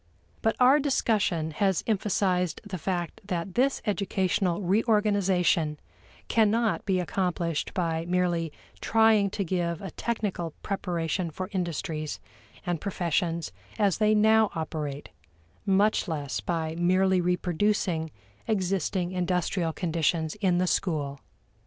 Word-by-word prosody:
But 225 - +1
our 260 +4 +6
discussion 210 - +1
has 190 +3 +1
emphasized 190 -5 0
the 185 - -5
fact 175 -1 -3
that 180 -1 -3
this 265 +5 +1
educational 195 -3 0
reorganization 190 -6 +2 0.5
cannot 225 0 +2
be 190 -2 +2
accomplished 175 -4 -1
by 165 -2 -1
merely 175 -3 0 0.3
trying 220 -3 +4
to 200 +1 -2
give 170 -2 -1
a 190 -3 -7
technical 200 -8 -3
preparation 175 -3 -2
for 185 +4 -5
industries 170 -4 -3 0.5
and 175 -3 -2
professions 170 -3 -1 0.3
as 200 -4 +2
they 215 0 +4
now 220 0 +5
operate, 150 -3 -4 0.6
much 200 +2 +3
less 145 -5 -3
by 160 -2 -2
merely 185 +1 +3
reproducing 180 -1 0 0.4
existing 190 -3 0
industrial 180 -1 0
conditions 160 -1 0
in 185 -3 +3
the 180 - +2
school. 145 -7 -1
180 Hz, 115 wpm, -27 LUFS, 165-200 Hz, 0.6 s, our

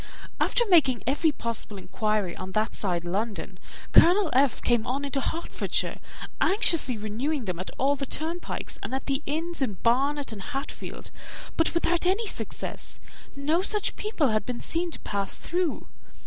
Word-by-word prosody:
After 480 - +2
making 300 - +4
every 295 +5 +2
possible 230 -5 -3
inquiry 210 -1 -1
on 185 0 -7
that 215 +1 +1
side 175 -4 -1
London, 195 0 -3 0.3
Colonel 360 0 +6
F. 265 0 +3
came 240 -1 +1
on 275 +3 -1
into 275 0 -1
Hertfordshire, 335 +5 -2 0.4
anxiously 335 - +5
renewing 235 +6 -2
them 180 -3 -3
at 185 - -4
all 275 +2 +2
the 275 -1 -4
turnpikes, 330 +5 -3
and 260 - -3
at 265 - -4
the 275 0 0
inns 330 +2 -1
in 250 -6 +1
Barnet 275 +3 +2
and 210 -3 -6
Hatfield, 275 +4 -6 0.4
but 330 +1 +2
without 345 +1 +2
any 400 +5 +2
success, - - -4 0.4
no 300 +5 +1
such 415 +2 0
people 415 - 0
had 215 -1 +1
been 245 +2 -4
seen 340 +1 -1
to - - -5
pass 200 -1 -1
through. 350 -2 -2
275 Hz, 160 wpm, -27 LUFS, 220-330 Hz, 0.4 s, Colonel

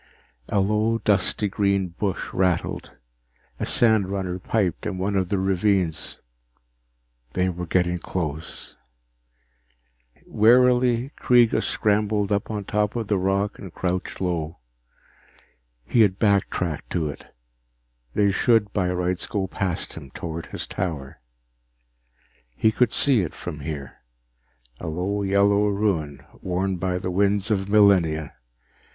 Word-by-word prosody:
_ - - -31 0.4
A 100 - +1
low, 105 +3 +1
dusty 105 -1 +1
green 100 -1 0
bush 95 +2 -3
rustled. 90 -2 -1 0.6
A - - -1
sandrunner 100 -5 +1
piped 95 -3 -1
in 95 - -3
one 100 +2 -1
of 95 -2 0
the 100 - +1
ravines. 95 -3 0 1.2
They 95 0 +1
were 90 -1 -5
getting 90 0 +1
close. 80 -3 -5 1.5
Wearily, 125 +2 +4
Kreega 120 -2 +4
scrambled 105 -1 +1
up 100 -1 0
on 105 -2 -4
top 105 +2 0
of 115 -3 -3
the 105 - +2
rock 100 +2 0
and 95 - -9
crouched 90 +1 -3
low. 85 -3 -2 1.3
He 115 - +3
had 100 -3 +3
backtracked 100 -6 0
to 80 -4 0
it; 75 - -8 0.9
they 100 -1 +3
should 110 0 +2
by 95 -3 +1
rights 90 0 -1
go 100 -3 -1
past 95 -2 -3
him 70 - -10
toward 80 +3 -6
his - - -5
tower. 80 -8 -5 1.3
He 110 - +3
could 120 +1 +2
see 135 -6 +3
it 85 - -4
from 75 - -6
here, 70 -2 -6 0.8
a 85 - -6
low 90 +6 -2
yellow 100 +1 +3
ruin 100 -9 -1 0.2
worn 95 +1 -1
by 90 0 -1
the 90 0 -3
winds 100 +2 +1
of 95 -2 0
millennia. 90 -8 +3
95 Hz, 130 wpm, -24 LUFS, 90-105 Hz, 1.5 s, Wearily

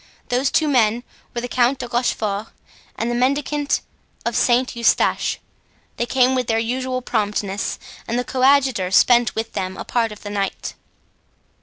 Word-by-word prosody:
Those 255 +2 +1
two 310 - +2
men 240 -4 +2 0.3
were 240 - -1
the 245 - -4
Count 245 +2 +2
de 245 - -5
Rochefort 220 -4 -1 0.5
and 235 +1 -1
the - - -1
mendicant 280 +3 0 0.4
of 235 -1 -1
Saint 250 +1 +2
Eustache. 235 0 +2 0.6
They 235 - -1
came 255 0 +3
with 255 -2 0
their 225 - +1
usual 255 +2 -2
promptness, 205 -3 -1 0.3
and 235 - -1
the 250 - 0
coadjutor 260 -7 +3
spent 240 +4 +4
with 225 +1 -3
them 185 0 -3
a - - -6
part 230 -2 0
of 210 - -11
the 205 - -6
night. 200 -1 -3
240 Hz, 160 wpm, -21 LUFS, 220-255 Hz, 0.6 s, spent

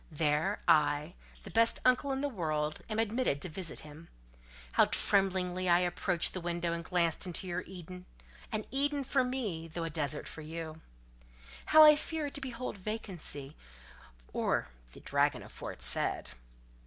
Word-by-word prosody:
There, 155 +5 +1
I, 150 +2 +3 0.3
the - - -9
best 230 0 +4
uncle 255 +2 +4
in 270 0 -1
the 290 - +1
world, 155 - -2
am 215 - -2
admitted 225 - +1
to 185 - -5
visit 170 0 -5
him. 155 +2 -12 0.6
How - - +5
tremblingly 185 -2 +2
I 175 +1 +5
approached 175 0 0
the 185 - -4
window 170 0 -1
and 170 0 -4
glanced 170 +1 0
into 180 +1 -3
your 180 0 -2
Eden—an 180 +4 -8
Eden 285 +1 +2
for 265 0 +2
me, 220 -11 -3
though 165 +1 -5
a 165 - -3
desert 150 -2 -2
for 160 - -8
you!—how - - 0
I 300 0 +10
feared 300 -1 -3
to 285 - -4
behold 250 -4 -5
vacancy, 185 -9 -4 0.8
or - - 0 0.2
the - - -12
dragon - - +1
aforesaid! - - -2
175 Hz, 145 wpm, -32 LUFS, 155-225 Hz, 0.8 s, I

